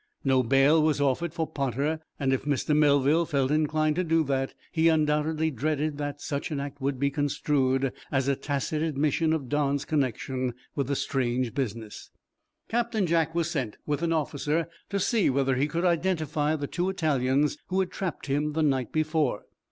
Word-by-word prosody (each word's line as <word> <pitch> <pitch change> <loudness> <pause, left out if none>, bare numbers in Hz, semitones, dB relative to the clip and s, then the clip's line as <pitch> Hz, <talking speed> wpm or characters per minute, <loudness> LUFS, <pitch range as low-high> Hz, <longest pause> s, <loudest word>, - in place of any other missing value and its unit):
No 130 -2 +3
bail 135 +6 +4
was 155 -1 +2
offered 145 +4 +1
for 160 - -2
"Potter." 140 +3 -1 0.2
If 135 -1 0
Mr. 145 +1 +1
Melville 150 +2 +4
felt 135 -2 +1
inclined 155 0 +1
to 180 - +2
do 165 -1 +2
that, 135 -2 -1 0.2
he 165 0 +3
undoubtedly 155 0 +1
dreaded 150 +2 -1
that 145 0 -4
such 140 0 -3
an 150 -3 -2
act 140 0 -6
would 135 -1 -1
be 140 +1 +1
construed 135 -2 0 0.2
as 135 -1 +1
a 140 - +2
tacit 145 +3 -2
admission 155 +1 +1
of 155 -5 -1
Don's 145 0 0
connection 130 -3 -1 0.2
with 140 -3 -1
the 140 - 0
strange 125 -3 -1
business. 115 -5 -4 0.6
Captain 230 -3 0
Jack 165 -1 +1
was 170 0 0
sent, 130 - -3
with 150 0 -1
an 170 -1 0
officer, 155 0 0 0.2
to 200 - -1
see 215 +1 +2
whether 135 0 +1
he 135 +3 +1
could 170 +4 -1
identify 160 -4 +1
the 145 -2 -3
two 175 +6 -1
Italians 145 -5 +1
who 190 +1 0
had 190 -1 0
trapped 185 -6 -4
him 145 +2 0
the 160 +1 +1
night 135 -5 +1
before. 155 -7 0
145 Hz, 175 wpm, -27 LUFS, 135-160 Hz, 0.6 s, bail